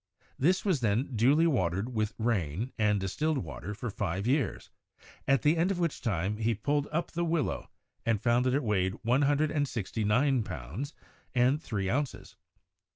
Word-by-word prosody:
This 180 +9 +2
was 185 -8 +2
then 120 +3 0
duly 140 +9 +4
watered 105 - 0
with 110 -1 -1
rain 110 - -1
and 105 -2 +2
distilled 150 - -1
water 85 - -5
for 120 +1 -4
five 95 0 -2
years, 130 - 0 0.6
at 135 0 +3
the 150 +2 +4
end 170 +3 +2
of 195 - 0
which 170 -3 -1
time 100 -1 -1
he 115 +1 +1
pulled 145 +7 0
up 165 +3 -1
the 170 0 -1
willow 165 -5 -1 0.3
and 115 -3 +1
found 120 +3 +2
that 130 - +2
it 145 - +1
weighed 95 -3 +1
one 125 +4 +3
hundred 145 +2 +2
and 145 -2 +1
sixty 115 -2 -3
nine 125 +5 +3
pounds 95 - -6 0.4
and 130 +5 +3
three 100 - -2
ounces. 135 +7 -2
120 Hz, 175 wpm, -30 LUFS, 105-145 Hz, 0.6 s, duly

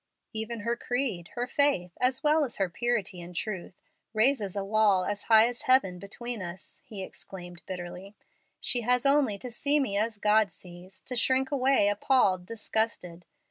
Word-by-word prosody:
"Even 220 +1 -4
her 235 +3 -1
creed, 240 -9 -2
her 245 0 -1
faith, 255 -10 +1
as 255 +1 +2
well 305 +1 +4
as 255 - 0
her 195 - +1
purity 205 -2 -2
and 175 +1 -11
truth, 190 -2 -4 0.4
raises 215 -4 +2
a 200 - -2
wall 200 -2 +3
as 205 0 -3
high 220 0 +6
as 245 0 -5
heaven 195 -9 +4
between 230 +3 -6
us," 185 +1 -8
he 200 -3 -6
exclaimed, 175 -2 -9
bitterly. 185 +2 -7 0.4
"She 245 - +1
has 250 +2 +2
only 275 -7 +3
to 245 +4 -7
see 285 +5 +2
me 205 -8 -1
as 220 0 -1
God 210 -1 +3
sees, 180 +2 -12
to 250 - -5
shrink 260 +3 +2
away 265 -6 +3
appalled, 205 -3 +2
disgusted. 220 -6 -2
215 Hz, 170 wpm, -28 LUFS, 190-245 Hz, 0.4 s, high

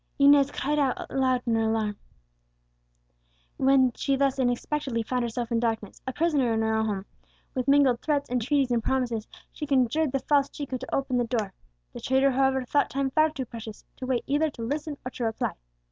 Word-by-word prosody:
Inez 280 0 +6
cried 295 +1 -1
out 270 -3 +1
aloud 255 -2 +1
in 235 - +1
her 225 0 +2
alarm, 215 -2 -1 1.6
when 265 -2 +4
she 275 +3 0
thus 270 0 +1
unexpectedly 250 0 -1
found 250 +2 -1
herself 235 0 -3
in 230 - +2
darkness, 225 -3 -2
a - - 0
prisoner 290 -5 +1
in 225 - +1
her 220 0 +1
own 220 0 +1
home. 200 -2 -3 0.5
With 255 -1 -2
mingled 275 -4 +4
threats, 290 -2 0
entreaties, 255 +2 +1
and 235 -2 +1
promises 240 -4 -1 0.3
she 300 - -5
conjured 275 +2 +2
the 270 - +1
false 280 +1 +2
Chico 275 -3 -5
to 260 +1 -4
open 270 -2 0
the 245 - +2
door. 220 -5 -2 0.4
The - - -8
traitor, 265 +1 +3
however, 265 0 +1
thought 285 +3 +1
time 270 0 -1
far 310 +3 +4
too 280 -4 -5
precious 225 -2 -9
to 255 - -6
wait 255 -2 0
either 295 +3 +1
to 240 -5 -8
listen 290 +4 -3
or 255 - -4
to 245 - -4
reply. 225 -1 -1
260 Hz, 195 wpm, -27 LUFS, 235-280 Hz, 1.6 s, Inez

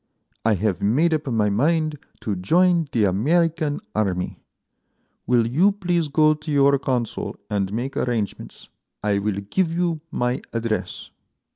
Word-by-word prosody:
I 110 -1 +3
have 95 -2 -1
made 150 +11 +2
up 155 -2 -2
my 110 -4 +1
mind 155 +6 +1 0.2
to 105 - -2
join 170 - +3
the 115 - +2
American 155 - +1
army. 95 -4 -1 0.9
Will 120 -2 +3
you 170 - +3
please 175 -5 0
go 155 +1 +4
to 155 +1 -7
your 140 -1 +4
Consul 125 -4 -2 0.2
and 100 -2 0
make 125 +6 -3
arrangements? 115 -5 -3 0.4
I 100 -1 +1
will 100 -1 -2
give 185 -4 +1
you 170 -2 -1
my 125 +1 -1
address." 110 -5 -3
130 Hz, 140 wpm, -23 LUFS, 105-160 Hz, 0.9 s, go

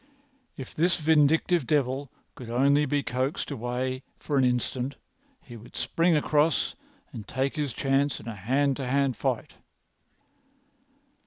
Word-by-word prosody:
If 130 - -8
this 170 +3 +2
vindictive 160 0 +3
devil 140 -2 0 0.2
could 120 -3 -10
only 140 +5 +3
be 145 +1 0
coaxed 130 +5 -2
away 130 +1 -3 0.2
for 145 - -3
an 135 - +4
instant 125 +2 0 0.5
he 120 - -11
would 115 +1 -13
spring 165 0 +2
across 150 0 +2 0.4
and 105 -4 -8
take 135 +2 -1
his 150 -3 -1
chance 135 +3 0
in - - -12
a 115 - -4
hand 130 +7 0
to 135 -3 -4
hand 135 -1 +1
fight. - - -3
135 Hz, 140 wpm, -27 LUFS, 125-145 Hz, 0.5 s, an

